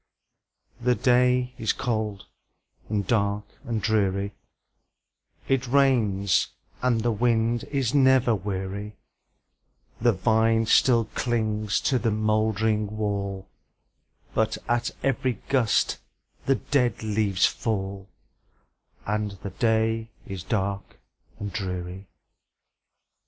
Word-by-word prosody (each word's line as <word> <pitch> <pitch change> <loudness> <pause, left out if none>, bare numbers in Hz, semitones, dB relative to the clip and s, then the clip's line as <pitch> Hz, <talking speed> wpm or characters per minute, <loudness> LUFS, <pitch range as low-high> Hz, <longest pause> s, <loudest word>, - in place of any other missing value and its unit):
The 125 +1 +2
day 125 0 +3
is 110 - +1
cold, 110 -4 -2 0.6
and 100 -2 0
dark, 105 -1 +1 0.2
and 115 -3 -1
dreary; 100 -2 +1 1.1
It 135 -1 +1
rains, 115 -8 +3 0.3
and 120 -3 +2
the 120 +1 +1
wind 115 +1 +1
is 135 -5 -1
never 130 -3 +5
weary; 100 +1 -4 1.1
The 120 0 +4
vine 110 +3 +2
still 115 0 +4
clings 110 -4 0
to 130 -3 +1
the 115 - +1
moldering 110 0 +1
wall, 100 -2 -2 0.9
But - - +1
at 120 0 +1
every 130 -1 +1 0.2
gust 125 -6 +2 0.5
the 135 - +4
dead 125 +1 0
leaves 105 -3 +2
fall, 100 -3 -2 1.0
And 105 0 -1
the 100 - -4
day 110 +1 +1 0.2
is 95 -6 -6
dark 100 -2 -3 0.4
and 100 -2 -5
dreary. 90 -1 -5
110 Hz, 100 wpm, -26 LUFS, 100-120 Hz, 1.1 s, never